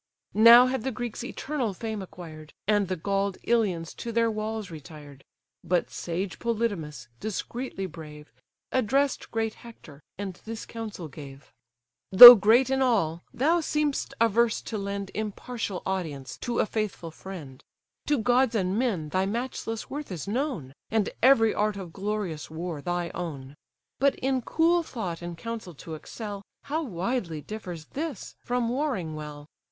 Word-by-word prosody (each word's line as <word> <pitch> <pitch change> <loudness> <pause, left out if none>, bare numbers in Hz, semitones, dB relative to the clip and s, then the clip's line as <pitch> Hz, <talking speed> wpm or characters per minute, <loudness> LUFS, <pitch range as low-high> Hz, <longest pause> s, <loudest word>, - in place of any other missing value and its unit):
Now 230 +3 +9
had 260 -1 -1
the 265 - -2
Greeks 240 0 -5
eternal 255 -4 -3
fame 220 0 -4
acquired, 160 -5 -10
And 205 -2 +3
the 185 - -1
gall'd 195 +2 -1
Ilians 190 -9 0
to 235 - -5
their 230 0 +2
walls 215 -2 -4
retired; 150 -3 -11 0.4
But 175 0 0
sage 180 +3 -4
Polydamas, 200 - -2
discreetly 220 0 -4
brave, 150 -5 -10 0.4
Address'd 265 +3 +1
great 225 -1 -1
Hector, 160 -11 -13 0.2
and 200 -1 -4
this 225 0 -6
counsel 215 -7 -7
gave: 140 -1 -12 0.6
"Though 240 +6 +15
great 235 +5 +4
in 265 0 +1
all, 195 -10 +1
thou 320 +7 +2
seem'st 300 -3 -1
averse 230 0 +3
to 220 - -4
lend 200 0 -4
Impartial 215 -1 -4
audience 160 -8 -3
to 240 -1 -3
a - - +3
faithful 210 -6 -3
friend; 160 -7 -10 0.4
To 295 - +3
gods 245 +1 +2
and 190 0 0
men 195 -12 -1
thy 185 +4 0
matchless 225 0 -4
worth 290 -4 -5
is 175 -2 -5
known, 215 - -2 0.2
And 220 -2 +1
every 230 -4 +5
art 210 -1 0
of 180 -4 -8
glorious 195 -5 -3
war 160 -1 -5
thy 175 +1 -2
own; 140 -5 -6 0.4
But 280 +1 +3
in 265 0 0
cool 335 +7 +2
thought 190 - -5
and 175 -1 -6
counsel 220 -4 -6
to 160 +3 -9
excel, 205 +5 -7 0.2
How 305 +3 -2
widely 190 - -3
differs 180 -5 -7
this 295 - -5
from 245 -1 -1
warring 240 - -2
well! 150 -1 -8
210 Hz, 150 wpm, -27 LUFS, 170-235 Hz, 0.6 s, Though